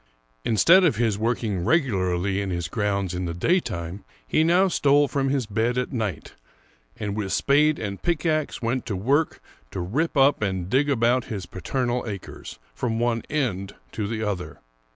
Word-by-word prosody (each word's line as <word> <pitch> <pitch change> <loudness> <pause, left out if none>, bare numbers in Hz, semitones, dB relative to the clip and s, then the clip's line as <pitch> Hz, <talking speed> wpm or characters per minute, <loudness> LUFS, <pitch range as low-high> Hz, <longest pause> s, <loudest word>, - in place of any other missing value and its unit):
Instead 165 - +5
of 160 -10 +3
his 110 -2 0
working 110 -5 -1
regularly 95 - +1
in 100 - -3
his 85 -2 -2
grounds 100 -1 -1
in 90 0 -3
the 85 -1 -4
daytime, 95 - -1 0.2
he 155 - +3
now 175 +4 +4
stole 145 -4 +3
from 135 0 0
his 135 -3 0
bed 115 +4 0
at 125 +3 -2
night, 110 -6 -3 0.6
and 105 -1 -3
with 100 -3 -3
spade 150 +2 +3
and 100 -3 -5
pickax 155 -5 -1
went 120 +2 0
to 105 - -2
work 140 - +1 0.3
to 95 - -6
rip 140 - -1
up 135 -1 +4
and 95 -3 -2
dig 145 +3 +3
about 120 -1 +2
his 100 -5 -5
paternal 120 +7 -2
acres, 100 -4 -7 0.2
from 115 -2 -2
one 115 0 0
end 100 -10 -2 0.2
to 105 -2 -3
the 110 0 -3
other. 100 -4 -4
115 Hz, 170 wpm, -24 LUFS, 100-140 Hz, 0.6 s, Instead